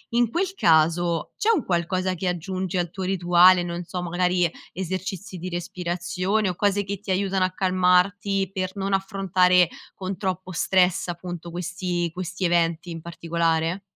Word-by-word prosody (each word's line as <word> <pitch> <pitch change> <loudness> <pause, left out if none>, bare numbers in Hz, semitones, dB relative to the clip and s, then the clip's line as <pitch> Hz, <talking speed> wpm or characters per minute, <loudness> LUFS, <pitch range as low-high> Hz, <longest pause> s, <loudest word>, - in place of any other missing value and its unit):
In 240 -1 +3
quel 380 +5 -1
caso, 165 - +2
c'è 430 - +1
un 330 - 0
qualcosa 185 +1 0
che 180 +2 -3
aggiungi 185 +1 -2
al 175 -1 -1
tuo 190 +2 -6
rituale, 180 0 +5
non 175 0 -4
so, 180 +1 -5
magari 180 0 +1 0.2
esercizi 185 +1 -4
di 180 +2 -5
respirazione 180 +3 -2
o 180 - -3
cose 205 +1 +1
che 200 0 -5
ti 205 -1 -5
aiutano 190 0 +1
a 185 - -2
calmarti 185 +1 +2
per 185 -2 -2
non 195 0 -1
affrontare 185 -2 +3 0.3
con 190 0 -5
troppo 185 -1 -3
stress 180 +1 +2
appunto, 175 -1 -6
questi 175 0 -2
questi 185 +2 -5
eventi 170 -1 +1
in 165 -1 -6
particolare? 170 +1 -1
180 Hz, 155 wpm, -24 LUFS, 175-190 Hz, 0.3 s, rituale